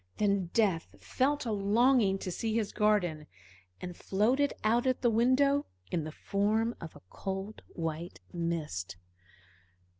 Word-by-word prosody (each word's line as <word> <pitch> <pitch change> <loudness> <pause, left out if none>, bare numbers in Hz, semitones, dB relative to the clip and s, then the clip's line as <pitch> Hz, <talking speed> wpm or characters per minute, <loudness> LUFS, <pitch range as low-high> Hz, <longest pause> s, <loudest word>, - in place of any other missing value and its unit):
Then 200 -3 +1
Death 185 -4 0
felt 280 +2 0
a 230 - -1
longing 210 +1 +3
to 185 - -5
see 220 +4 -2
his 220 -3 0
garden, 180 -8 +1 0.5
and 180 -1 -6
floated 245 +12 +1
out 235 +4 +2
at 255 - +1
the 240 - +4
window 265 +5 +3 0.2
in 165 -3 -1
the 155 - -5
form 215 +7 0
of 165 - -8
a - - -15
cold, 195 +2 -5
white 165 +1 -5
mist. 155 - -3
205 Hz, 140 wpm, -31 LUFS, 175-235 Hz, 0.5 s, the